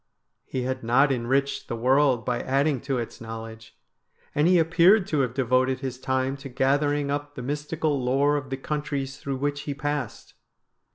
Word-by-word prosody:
He 130 - -3
had 130 +1 -2
not 135 +5 +4
enriched 135 +3 0
the - - -3
world 130 0 +3
by 125 -1 0
adding 135 0 +1
to 135 - -2
its 120 -1 -5
knowledge, 115 0 -9 0.6
and 150 +3 +3
he 180 0 +5
appeared 175 +5 +5
to 155 -6 -1
have 125 -3 0
devoted 130 0 +1
his 130 -2 -4
time 130 +1 -1
to 135 0 -9
gathering 140 +2 +1
up 145 0 -4
the 125 - -6
mystical 150 0 -2
lore 140 +4 +2
of 135 -2 -3
the 135 - -3
countries 140 -2 -3
through 135 -1 -3
which 145 +1 -2
he 140 - -2
passed. 145 -4 -4
135 Hz, 175 wpm, -25 LUFS, 130-145 Hz, 0.6 s, he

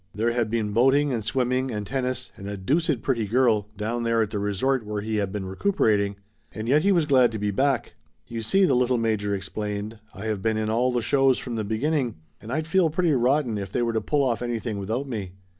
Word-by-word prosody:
There 115 +3 +1
had 115 -2 0
been 110 -2 -1
boating 135 +4 +3
and 115 -3 -2
swimming 130 +2 0
and 105 -3 -3
tennis 130 +1 -3
and 100 +1 -8
"a 100 - -4
deuced 145 - 0
pretty 115 -6 0
girl" 115 -3 +2
down 115 +3 -2
there 115 -1 +2
at 105 - -5
the 105 - -2
resort 105 +6 0
where 105 -1 -4
he 110 0 -2
had 100 -2 -1
been 100 -2 -4
recuperating, 100 - +1 0.4
and 110 +1 -6
yet 145 +5 +4
he 200 - +3
was 170 -5 +3
glad 130 -5 +4
to - - -2
be 105 0 -1
back. 135 +3 0 0.3
"You 115 -1 -5
see," 195 - +3
the 140 - +2
little 125 0 +2
major 110 -3 0
explained, 105 +2 -5
"I 95 +3 -9
have 105 -3 -2
been 110 +1 0
in 110 0 -1
all 125 +3 +2
the 120 -2 -1
shows 135 +1 +3
from 125 - -5
the 110 -1 -2
beginning 120 +4 -1 0.3
and 110 - -8
I'd 155 +4 -1
feel 165 +1 +3
pretty 165 0 +1
rotten 125 -3 +1
if 100 -1 -6
they 120 - 0
were 115 -1 0
to 110 - 0
pull 145 -2 +1 0.2
anything 115 -3 -3
off - - -4
without 115 +8 -3
me. 100 -8 -5
115 Hz, 235 wpm, -25 LUFS, 105-130 Hz, 0.4 s, yet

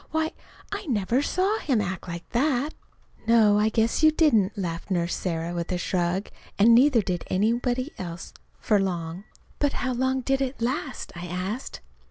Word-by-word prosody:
"Why, 315 0 0 0.4
I 410 -2 -4
never 230 +1 +1
saw 380 +8 +1
him 260 -7 +1
act 190 -3 -3
like 170 0 -6
that!" 275 +3 +1 0.5
"No, 215 -3 +5
I 215 +1 +3
guess 225 +4 +1
you 310 - +7
didn't," 230 - +3
laughed 170 -2 -4
Nurse 175 -2 0
Sarah 170 -1 -2
with 170 +1 -3
a 180 - 0
shrug. 180 +2 -1 0.3
"And 225 +3 +6
neither 245 -2 +5
did 180 -2 -2
anybody 245 +7 0
else 170 -2 -7 0.3
for 210 -2 +2
long." 175 -1 -3 0.3
"But 290 -1 +1
how 255 0 -1
long 260 +1 0
did 270 +2 0
it 265 0 -2
last?" 260 +3 -3
I 175 +1 -6
asked. 185 +8 -4
220 Hz, 170 wpm, -26 LUFS, 180-265 Hz, 0.5 s, you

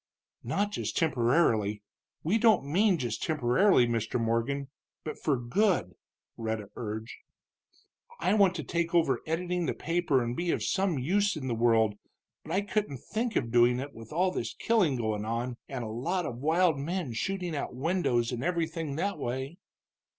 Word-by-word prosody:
"Not 205 +1 0
just - - -3
temporarily, 120 - +2 0.4
we 200 +9 +2
don't 215 - +4
mean 185 +6 +3
just 120 -6 -3
temporarily, 150 +2 +3
Mr. 115 0 -1
Morgan, 115 +5 -1 0.3
but 155 - -6
for 145 -4 +1
good," 165 - +1 0.4
Rhetta 110 -2 -3
urged. 110 0 -5 1.1
"I 185 +4 +2
want 195 -4 +4
to - - -3
take 170 0 -1
over 135 -8 +3
editing 175 +1 -1
the - - -1
paper 165 -5 +1
and 120 +1 -3
be 175 +4 -2
of - - 0
some 190 -5 +1
use 200 +10 +1
in 150 -4 -5
the 120 - 0
world, 110 -2 +2 0.4
but 155 - -9
I 190 +4 +2
couldn't 205 -8 -2
think 225 +1 -2
of 115 -2 0
doing 120 +1 +4
it 140 +2 -6
with 115 -1 -12
all 180 +4 +2
this - - -4
killing 200 -12 +2
going 110 -3 -1
on, 120 +2 -3
and 130 -3 -4
a - - -4
lot 170 +10 -1
of 120 - -4
wild 160 0 +3
men 160 -3 -3
shooting 180 +6 -2
out 140 - -4
windows 130 -6 +1
and 125 -1 -3
everything 165 -4 -1
that 195 +2 -2
way." 130 +6 -4
145 Hz, 170 wpm, -29 LUFS, 120-180 Hz, 1.1 s, don't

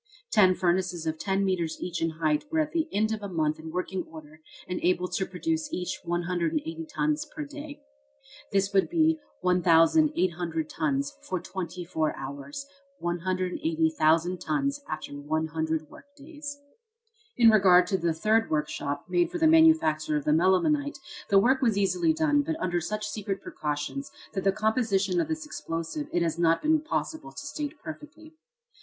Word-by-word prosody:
Ten 185 -3 +5
furnaces 180 -2 0
of 160 0 -2
ten 195 0 0
metres 175 -4 -1
each 175 -2 -4
in 165 - +2
height 155 -2 0
were 320 - 0
at 310 -1 0
the 325 -1 0
end 215 +2 +1
of 220 -1 -2
a 200 - -4
month 155 -3 0
in 160 0 -8
working 180 +2 -2
order 155 -1 -12 0.3
and 180 - -3
able 180 0 +1
to 185 +1 -2
produce 315 - -2
each 180 - -3
180 180 - -2
tons 300 0 0
per 305 - -3
day. 290 0 -9 0.7
This 195 0 +1
would 195 - +3
be 320 -2 +3 0.2
1,800 175 - +3
tons 140 -3 -1
for 185 - -3
twenty 180 -1 -6
four 160 -2 -1
hours 140 - -6 0.3
180,000 185 - 0
tons 280 +2 -1
after 155 -2 -5
100 155 +2 -2
work 280 - -14
days. 290 -1 -8 0.8
In 230 -2 +7
regard 185 -4 +6
to 190 +1 0
the 170 -1 +1
third 220 +7 +2
workshop, 145 -2 -2
made 175 -1 +2
for - - -4
the 325 - +2
manufacture 315 - +4
of 145 - -4
the 150 - +3
melimelonite, 280 - +2 0.3
the 200 - +5
work 255 +7 +4
was 230 -6 +2
easily 320 - +2
done, 310 -2 +2
but 320 +2 -3
under 175 -1 0
such 215 +5 -3
secret 200 -2 -3
precautions, 150 - -4 0.2
that 195 - -2
the 195 - +4
composition 205 -4 +1
of - - -2
this 315 -1 -3
explosive 220 - -4
it 175 - +1
has 165 0 -1
not 165 -1 +3
been 310 0 +3
possible 315 0 -3
to - - -8
state 290 +1 -4
perfectly. 315 0 -10
190 Hz, 165 wpm, -27 LUFS, -, 0.8 s, In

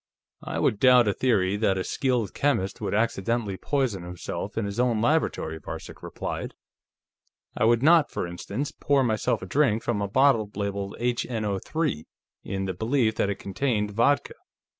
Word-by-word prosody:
"I - - -5
would 105 - +1
doubt 125 -2 +6
a 105 - +2
theory 100 -6 +1
that 100 -3 +1
a 95 - -1
skilled 125 -3 -1
chemist 135 -10 0
would - - -1
accidentally 110 -1 0
poison 130 -4 -1
himself 90 +4 -6
in 110 - 0
his 100 +3 -4
own 120 -3 +2
laboratory," 115 - 0
Varcek - - -8
replied. - - -5 1.0
"I - - +1
would 120 +2 +3
not, 160 0 +6
for - - -3
instance, 100 +11 -4
pour 140 -3 +1
myself 110 -5 0
a - - -4
drink 115 0 +1
from 105 -4 -1
a 100 - -1
bottle 120 -1 +3
labeled 100 -1 -3
HNO_3 120 - -2 0.4
in 95 0 -3
the 95 - -2
belief 110 +3 +1
that 100 - 0
it 100 - -1
contained 105 +1 -1
vodka. 120 +7 +2
110 Hz, 160 wpm, -26 LUFS, 100-130 Hz, 1.0 s, doubt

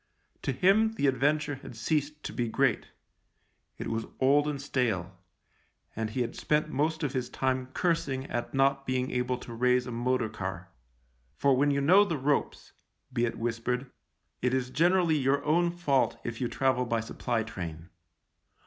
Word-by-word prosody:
To - - -1
him 200 - +3
the 145 - -1
Adventure 145 +2 +1
had - - -10
ceased 150 +5 -1
to - - -5
be 120 -2 -1
great; 130 +1 +1 0.9
it - - -5
was 115 0 -2
old 145 +3 +4
and 145 -2 -2
stale, 115 -10 -1 0.8
and 110 0 -2
he 125 +4 -2
had 120 - -2
spent 155 0 0
most 160 +3 0
of 145 -2 -1
his 130 -2 -2
time 130 -1 -1
cursing 150 -7 0
at 120 -3 -3
not 135 0 +2
being 130 0 0
able 125 0 0
to 120 -1 -9
raise 125 +1 +2
a 125 - -6
motor 120 0 0
car. - - -6 0.7
For 135 - +3
when 145 +3 +3
you 140 0 +1
know 185 +8 +6
the 170 -6 -2
ropes 140 +1 -1 0.2
— - - -32
be 120 - +2
it 115 - -3
whispered 120 +3 -2 0.2
— - - -49
it 125 +1 +1
is 130 -1 -2
generally 170 0 +3
your 140 +1 +1
own 170 +3 +3
fault 170 -6 +1
if 120 0 -5
you 125 - +1
travel 125 0 +1
by 115 -1 +1
supply 115 0 -2
train. 85 -6 -7
130 Hz, 175 wpm, -29 LUFS, 120-145 Hz, 0.9 s, know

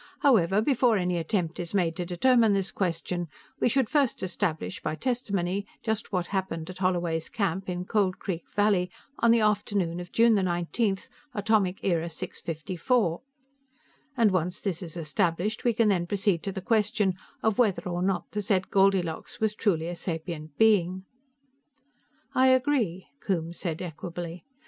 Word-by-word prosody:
"However, 210 -6 +4
before 245 -4 +3
any 180 -1 0
attempt 165 0 -1
is 175 +2 -4
made 170 -4 +1
to 175 -2 -3
determine 225 +4 +4
this 195 -2 -1
question, 175 -1 -2 0.3
we - - +3
should 265 0 +2
first 280 -5 +1
establish, 170 - -2
by - - -2
testimony, 200 -4 -1 0.2
just 220 -1 -2
what 180 -3 0
happened 185 -4 -3
at 185 - -11
Holloway's 175 -3 0
Camp, 190 -2 -2
in 180 0 -3
Cold 195 -3 +1
Creek 175 -3 -4
Valley, 205 -3 +3 0.3
on 235 - +4
the 230 0 +5
afternoon 205 -5 +1
of 175 0 -8
June 230 0 +5
19, 190 +2 +1 0.4
Atomic 205 -3 +1
Era 170 -3 +1
Six 160 - -5
Fifty 165 +3 -5
Four, 180 -4 +1 1.0
and 225 -4 +4
once 180 0 -1
this 190 -4 -2
is 175 -2 -7
established, 170 +6 -1
we 240 - +4
can 225 -1 +2
then 175 -3 +1
proceed 195 -3 +1
to 195 - -3
the 190 - -5
question 210 -2 +2 0.3
of 220 0 +1
whether 215 -6 +3
or 175 0 -2
not 190 0 -1
the 210 - -2
said 190 -2 0
Goldilocks 190 -4 +1
was 220 -1 +1
truly 175 -7 0
a 175 - -3
sapient 160 -3 -5
being." 190 -4 +3 1.3
"I 260 +1 +4
agree," 255 - +2
Coombes 170 -3 -2
said 170 -1 -3
equably. 170 +1 -6
190 Hz, 160 wpm, -27 LUFS, 175-210 Hz, 1.3 s, the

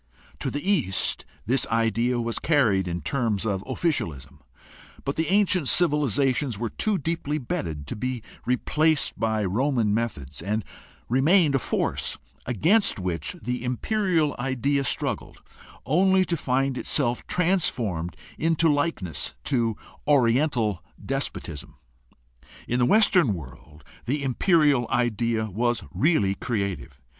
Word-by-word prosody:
To - - -2
the 145 +6 -5
East 140 - +1 0.2
this 125 +3 +1
idea 115 +2 +1
was 115 -1 -2
carried 110 - +2
in 85 0 -3
terms 115 - -1
of 100 -3 -1
officialism, 80 - -2 0.6
but 140 - -2
the 160 0 -1
ancient 185 -5 +2
civilizations 140 - +2
were 115 +1 -3
too 215 -2 0
deeply 155 -2 -2
bedded 80 - -4
to - - -5
be 125 0 -3 0.2
replaced 155 +5 +1
by 110 -2 0
Roman 115 +1 +1
methods, 90 - -3
and 105 +3 -2 0.4
remained 150 - +4
a 135 - +3
force - - -1 0.3
against 165 - +3
which 85 -4 -2
the 125 +2 -3
imperial 165 - 0
idea 135 +2 0
struggled - - -2 0.4
only 190 +5 +3
to 175 - -1
find 135 -2 0
itself 125 -4 +1
transformed 120 - 0 0.2
into 165 -1 +3
likeness 145 - -2
to 115 -6 0 0.3
Oriental 120 - +2 0.2
despotism. 95 - -4 0.9
In 120 - 0
the 120 - +3
Western 180 - +4
world 75 0 -12 0.2
the 140 +3 -1
imperial 145 - +3
idea 115 -2 0
was 120 +4 0
really 130 - +2
creative. 100 - -4
125 Hz, 120 wpm, -25 LUFS, 105-150 Hz, 0.9 s, remained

